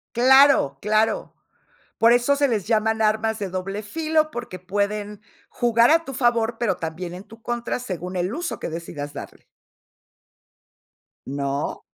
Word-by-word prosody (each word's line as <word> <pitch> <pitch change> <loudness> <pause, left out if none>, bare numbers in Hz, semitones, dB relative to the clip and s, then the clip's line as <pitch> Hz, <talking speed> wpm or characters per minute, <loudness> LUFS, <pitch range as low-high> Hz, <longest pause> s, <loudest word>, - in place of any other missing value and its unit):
Claro, 265 - +5
claro. 215 +2 0 0.6
Por 230 +1 +5
eso 245 +4 +3
se 285 0 +2
les 215 -6 -1
llaman 220 0 +1
armas 220 0 +1
de 200 -3 -3
doble 190 +3 -4
filo, 310 +6 0
porque 240 -9 -6
pueden 205 +2 -3 0.3
jugar 235 +1 +3
a 330 +1 +4
tu 270 - -7
favor, 235 -3 +1
pero 210 -7 +1
también 170 +1 -5
en 185 +2 -9
tu 225 +2 -15
contra 240 +1 -3
según 185 -6 -6
el 180 +4 -1
uso 345 +3 -4
que - - -4
decidas 160 -3 -6
darle. - - -9 1.8
¿No? 140 0 -3
220 Hz, 145 wpm, -23 LUFS, 185-240 Hz, 1.8 s, Claro